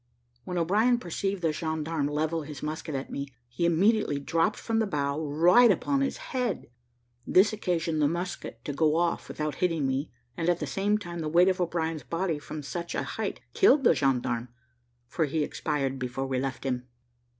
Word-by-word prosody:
When 180 - -3
O'Brien 210 +9 +3
perceived 195 -1 -3
the 160 - +3
gendarme 160 -1 -2
level 155 +2 -1
his 150 -2 -8
musket 155 0 -4
at 135 - -4
me, 140 0 -4 0.2
he 120 +8 0
immediately 190 -1 +3
dropped 165 +4 +1
from 225 -1 -1
the 220 - +1
bough, 145 -3 -1
right 175 +11 +5
upon 275 +7 +2
his 275 - 0
head; 245 - -3 0.6
this 195 +4 +5
occasioned 170 -6 -1
the 145 - +5
musket 170 -8 -4
to 145 - -3
go 155 +1 +2
off, 170 0 0
without 150 -1 -3
hitting 165 -5 +1
me, 135 +3 -1 0.3
and 165 0 0
at 175 -1 +2
the - - -2
same 205 +2 +1
time 175 -4 -7
the 155 -2 -2
weight 175 +4 +5
of 185 0 0
O'Brien's 165 -2 -1
body 165 +5 -2
from 150 +1 -7
such 170 +4 -4
a - - 0
height - - -4
killed 300 -8 +5
the - - +6
gendarme, 125 -3 0 0.6
for 160 +6 0
he 150 +1 0
expired 140 -3 -2
before 130 +1 -3
we 130 -1 -1
left 130 -1 -3
him. 125 -2 -2
160 Hz, 185 wpm, -28 LUFS, 145-180 Hz, 0.6 s, the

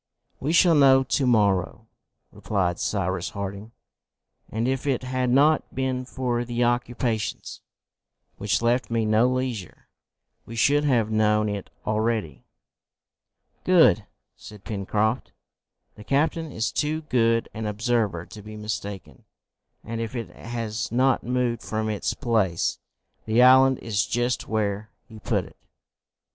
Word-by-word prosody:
"We 145 - -1
shall 175 0 +5
know 135 -3 +6
to 130 +1 0
morrow," 100 -6 +1 0.5
replied 90 -4 -1
Cyrus 95 -3 -1
Harding, 100 +2 -6 0.8
"and 115 +2 -2
if 130 +2 -2
it 130 -2 0
had 130 0 -1
not 145 +5 +3
been 130 -1 -1
for 125 -2 -2
the 120 0 -1
occupations 120 -2 -2 0.8
which 105 +3 0
left 120 +2 +1
me 115 -1 0
no 110 +3 +3
leisure, 130 -6 -4 0.5
we 115 - -10
should 145 +6 +3
have 115 -6 +2
known 105 0 +2
it 100 -2 -5 0.2
already." 110 - -2 1.2
"Good!" - - +4 0.3
said 105 -2 -13
Pencroft. 110 +3 -1 0.6
"The 105 - -13
captain 155 +6 0
is 110 -3 -2
too 155 +1 -1
good 115 -5 +1
an 110 -1 -4
observer 105 -5 -1
to 105 - -11
be 110 +1 -10
mistaken, 105 -2 -6 0.6
and, 115 0 -5
if 115 +1 -5
it 115 -6 -4
has 115 -2 -4
not 130 +3 +2
moved 125 -1 -1
from 110 0 -3
its 105 -2 -2
place, 110 - 0 0.5
the 115 +3 +4
island 130 +1 +6
is 105 -3 -1
just 120 +1 -1
where 105 -1 -2 0.2
he 110 -2 -12
put - - -1
it." - - -16
115 Hz, 130 wpm, -25 LUFS, 105-125 Hz, 1.2 s, know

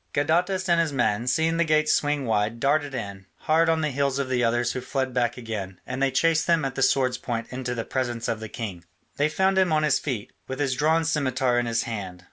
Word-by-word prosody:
Gadatas 180 +6 +1
and 170 -1 +4
his 165 -3 -1
men, 120 -3 0
seeing 160 +5 +2
the 170 - +3
gates 155 -1 +3
swing 145 -2 0
wide, 110 +1 0
darted 145 +1 +1
in, 100 -4 -6
hard 165 +1 +3
on 160 -1 +2
the 155 -1 0
heels 140 0 0
of 140 -2 -2
the 125 -1 +1
others 120 +1 +1
who 130 - -4
fled 130 0 -2
back 120 -1 0
again, 105 -6 -6
and 130 +1 -5
they 135 - +3
chased 155 +5 +2
them 165 -4 +3
at 135 - -2
the 135 - -4
sword's 130 -1 +2
point 115 -2 -3
into 125 -1 -4
the 115 - -3
presence 120 -3 -2
of 115 -2 -1
the 110 -1 -7
king. 100 -8 -6 0.3
They 145 +2 +2
found 190 +4 +2
him 185 -3 +3
on 155 0 +2
his 150 - +3
feet, 125 -8 -4
with 130 +1 -5
his 140 -3 +1
drawn 160 +4 +2
scimitar 130 -5 +1
in 120 - -1
his 115 0 0
hand. 95 -6 -6
130 Hz, 240 wpm, -25 LUFS, 120-155 Hz, 0.3 s, and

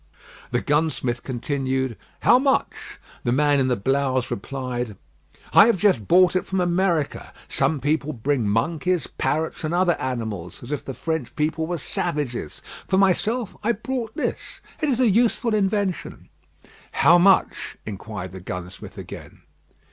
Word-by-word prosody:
The - - 0
gunsmith 145 -5 0
continued 130 -1 -2 0.3
"How 245 - +6
much?" 270 0 -1 0.3
The 120 - 0
man 145 +2 +3
in 130 - +2
the 125 - +2
blouse 130 +3 0
replied 125 -2 -4 0.6
"I - - +8
have 235 - +3
just 175 - +2
brought 180 0 +5
it 185 - +2
from 190 - -1
America. 175 -3 0 0.2
Some 140 +2 +1
people 150 +2 0
bring 125 -3 0
monkeys, 165 - 0
parrots, 160 +2 -2
and 155 +2 -1
other 180 -1 +3
animals, 110 -9 -4
as 120 - -8
if 150 - -2
the 135 - -6
French 160 -6 -3
people 160 +1 -1
were 175 0 -2
savages. 145 - -3 0.2
For 190 - +2
myself 205 +4 +1
I 235 +3 +2
brought 235 +1 -4
this. - - -4 0.2
It 305 - +1
is 255 -3 +1
a 255 - +4
useful 230 +2 +2
invention." 200 -2 -1 0.6
"How 175 +1 +6
much?" 190 +1 +3
inquired 100 -3 -6
the 95 - -8
gunsmith 90 +1 -8
again. - - -10
150 Hz, 150 wpm, -23 LUFS, 125-185 Hz, 0.6 s, I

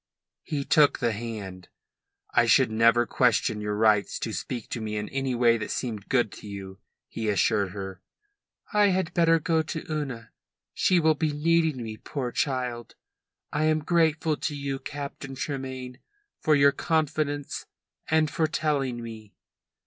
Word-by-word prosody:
He 140 -2 -3
took 150 -2 +4
the 120 -4 +1
hand. 105 -5 -6 0.7
"I - - +4
should - - +5
never 115 +2 +4
question 115 -4 +2
your 105 0 -2
right 105 -1 +4
to 110 - -3
speak 105 +7 -4
to 120 - -4
me 105 -1 -3
in 105 - -3
any 135 -2 -1
way 120 -1 +4
that 110 - -4
seemed 110 -5 -4
good 120 -6 +2
to 105 - -11
you," 95 -1 -8 0.3
he 110 -1 -3
assured 100 0 +2
her. 95 -2 -7 0.7
"I 210 -1 +5
had 185 -3 0
better 165 -1 +4
go 160 0 +1
to 160 +1 -5
Una. 135 -7 -4 0.4
She 180 -2 +3
will 160 -1 +4
be 155 +1 -1
needing 160 -3 +1
me, 110 -1 -6
poor 130 +1 -4
child. 125 -4 -2 0.6
I 150 +1 +1
am 155 -1 +2
grateful 160 -2 +2
to 150 - -3
you, 140 -1 -3
Captain 140 -2 -7
Tremayne, 130 -2 -5 0.4
for 155 - +3
your 140 0 +6
confidence 150 -2 -1 0.4
and 155 -1 +3
for 160 - +1
telling 140 -7 -1
me." 110 -2 -10
130 Hz, 155 wpm, -27 LUFS, 110-155 Hz, 0.7 s, your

